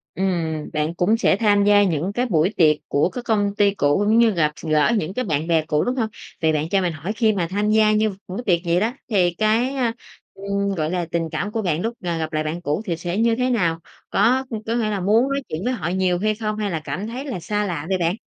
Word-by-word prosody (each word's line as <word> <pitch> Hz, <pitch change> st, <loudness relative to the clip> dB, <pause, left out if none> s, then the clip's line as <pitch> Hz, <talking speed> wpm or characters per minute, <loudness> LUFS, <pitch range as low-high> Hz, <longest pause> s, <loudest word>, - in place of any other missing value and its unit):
Ừm, 165 Hz, -5 st, -2 dB
bạn 155 Hz, +2 st, -1 dB
cũng 200 Hz, +6 st, +2 dB
sẽ 200 Hz, -, +2 dB
tham 205 Hz, -2 st, +3 dB
gia 205 Hz, 0 st, +5 dB
những 180 Hz, +1 st, 0 dB
cái 245 Hz, +4 st, 0 dB
buổi 175 Hz, -3 st, +2 dB
tiệc 155 Hz, -3 st, +5 dB
của 145 Hz, +5 st, +2 dB
các 245 Hz, -1 st, -7 dB
công 205 Hz, -3 st, +1 dB
ty 205 Hz, -1 st, +4 dB
cũ, 145 Hz, -2 st, +2 dB
cũng 220 Hz, +2 st, +4 dB
như 230 Hz, -1 st, +5 dB
gặp 155 Hz, -6 st, +1 dB
x -, -, -10 dB
gỡ 155 Hz, +3 st, +3 dB
những 185 Hz, -1 st, -2 dB
cái 255 Hz, -, -1 dB
bạn 155 Hz, -3 st, -1 dB
bè 165 Hz, -2 st, +2 dB
cũ, 150 Hz, -1 st, +1 dB
đúng 250 Hz, +2 st, -1 dB
hông? 225 Hz, -3 st, 0 dB, 0.3 s
Vậy 160 Hz, -, +3 dB
bạn 155 Hz, +1 st, -1 dB
cho 195 Hz, +1 st, +2 dB
mình 175 Hz, -2 st, 0 dB
hỏi 160 Hz, +7 st, -4 dB
khi 220 Hz, -1 st, +2 dB
mà 180 Hz, -4 st, -1 dB
tham 205 Hz, +2 st, 0 dB
gia 215 Hz, 0 st, +4 dB
như 215 Hz, 0 st, +2 dB
những 200 Hz, -, -6 dB
buổi 190 Hz, +7 st, -5 dB
tiệc 175 Hz, -3 st, +3 dB
vậy 175 Hz, +1 st, +2 dB
đó, 225 Hz, +3 st, 0 dB, 0.2 s
thì 180 Hz, -4 st, +2 dB
cái, 225 Hz, +5 st, +2 dB
a, 245 Hz, -4 st, 0 dB, 0.4 s
ừm, 200 Hz, 0 st, -2 dB
gọi 155 Hz, -1 st, -1 dB
là, 175 Hz, -2 st, -1 dB
tình 165 Hz, -1 st, -1 dB
cảm 205 Hz, -, -2 dB
của 225 Hz, -1 st, -2 dB
bạn 170 Hz, -3 st, 0 dB
lúc 230 Hz, +1 st, -2 dB
là 170 Hz, -2 st, -2 dB
gặp 160 Hz, 0 st, -3 dB
lại 155 Hz, 0 st, -1 dB
bạn 160 Hz, +3 st, -3 dB
cũ 150 Hz, +8 st, -1 dB
thì 170 Hz, -5 st, -2 dB
sẽ 175 Hz, +2 st, -4 dB
như 230 Hz, +1 st, +3 dB
thế 255 Hz, 0 st, 0 dB
nào? 170 Hz, -9 st, +1 dB, 0.3 s
Có 260 Hz, +3 st, +3 dB, 0.2 s
có 230 Hz, -, -1 dB
nghĩa 225 Hz, -3 st, 0 dB
là 205 Hz, -2 st, -2 dB
muốn 220 Hz, +8 st, +3 dB
nói 275 Hz, 0 st, -1 dB
chuyện 160 Hz, +5 st, -4 dB
với 250 Hz, -, 0 dB
họ 195 Hz, -9 st, -3 dB
nhiều 180 Hz, -1 st, +1 dB
hay 215 Hz, +2 st, 0 dB
không? 215 Hz, -1 st, -3 dB
Hay 210 Hz, -2 st, -2 dB
là 160 Hz, -2 st, -2 dB
cảm 200 Hz, +4 st, -4 dB
thấy 250 Hz, +5 st, -6 dB
là 250 Hz, -11 st, -5 dB
xa 210 Hz, +4 st, -1 dB
lạ 160 Hz, -4 st, -4 dB
vậy 190 Hz, -1 st, +1 dB
bạn? 170 Hz, +1 st, +1 dB
195 Hz, 275 wpm, -22 LUFS, 165-220 Hz, 0.4 s, gia